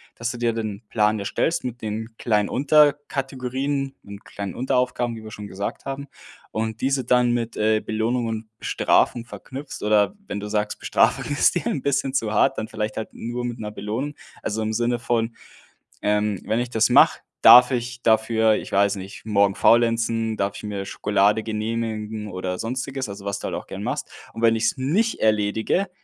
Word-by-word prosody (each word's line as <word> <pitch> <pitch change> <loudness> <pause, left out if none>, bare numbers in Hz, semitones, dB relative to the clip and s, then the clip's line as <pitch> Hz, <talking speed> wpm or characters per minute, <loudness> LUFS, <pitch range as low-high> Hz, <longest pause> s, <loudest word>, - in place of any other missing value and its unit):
dass 120 +1 -2
du 120 - -7
dir 120 -1 +1
den 110 -1 -4
Plan 105 0 +2
erstellst 100 +11 -1
mit 125 0 -5
den 110 +1 -5
kleinen 105 -3 +1
Unterkategorien 135 -1 +1
und 100 0 -10
kleinen 100 -2 -6
Unteraufgaben, 125 -1 0
wie 110 - -10
wir 110 - -9
schon 105 -1 -8
gesagt 100 +1 -5
haben 135 +1 -5 0.4
und 110 0 -3
diese 135 0 +1
dann 125 -1 +3
mit, 120 -1 -2
äh, 110 0 +3
Belohnung 115 +3 -1
und 110 -1 -4
Bestrafung 120 -1 +2
verknüpfst. 135 +4 -8
Oder 105 - +3
wenn 100 - -4
du 105 - -6
sagst, 105 0 -1
Bestrafung - - +2
ist 145 - +3
dir 175 - -1
'n 140 - -1
bisschen 135 -1 0
zu 110 -5 0
hart, 105 - +3
dann 110 - -3
vielleicht 110 -1 -4
halt 110 - -5
nur 120 +2 -5
mit 120 -1 -4
'ner 105 -1 -5
Belohnung. 110 +8 -4 0.3
Also, 110 +1 -2
im 110 0 -1
Sinne 120 +1 0
von, 115 -1 -1 0.7
ähm: 105 -1 +1
„Wenn 110 - 0
ich 120 0 -2
das 110 -2 +2
mache, - - +6 0.2
darf 125 +1 +9
ich 120 -1 -3
dafür- 110 0 +3
ich - - -6
weiß 100 +1 +3
nicht- 95 +1 -9
morgen 100 -2 +3
faulenzen, 115 -1 +2
darf 100 0 -1
ich - - -10
mir 100 -2 -4
Schokolade 105 +2 +1
genehmigen“ 110 -1 -3
oder 90 0 -4
sonstiges, 130 +1 -3
also, 100 0 -8
was 100 0 -2
du - - -7
halt - - -3
auch - - -6
gern - - -6
machst. - - -3 0.2
Und 115 - -7
wenn 115 0 +5
ich's 115 +5 0
nicht 185 - +1
erledige- 110 - +1
115 Hz, 185 wpm, -23 LUFS, 105-125 Hz, 0.7 s, darf